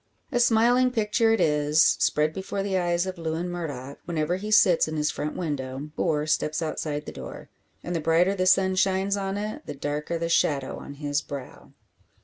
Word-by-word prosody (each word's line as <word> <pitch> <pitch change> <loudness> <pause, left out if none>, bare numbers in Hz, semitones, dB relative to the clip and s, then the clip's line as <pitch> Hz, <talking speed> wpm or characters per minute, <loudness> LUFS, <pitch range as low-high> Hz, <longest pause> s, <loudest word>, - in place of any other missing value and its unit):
A 245 - +1
smiling 240 +2 +4
picture 225 -1 +1
it 225 - +2
is; 150 0 +2
spread 150 +1 +2
before 195 +2 -4
the 195 -1 -2
eyes 175 -1 +1
of 185 -2 -6
Lewin 165 +2 -3
Murdock, 145 -6 -6
whenever 170 +1 -1
he 210 +3 -6
sits 180 -6 +5
in 155 0 -4
his 150 0 +1
front 150 +1 -4
window, 145 -3 -4
or 150 -1 0
steps 155 0 0
outside 150 -2 -3
the - - -6
door. - - -9 0.3
And 175 - -3
the - - 0
brighter 165 +5 +3
the 185 -2 0
sun 190 0 +4
shines 190 +1 +1
on 195 0 -3
it, 215 +9 -5
the - - -5
darker 150 +4 -3
the 165 0 -2
shadow 145 -5 +1
on 140 - -9
his 145 0 -1
brow! 140 -2 -9
170 Hz, 190 wpm, -26 LUFS, 150-195 Hz, 0.3 s, sits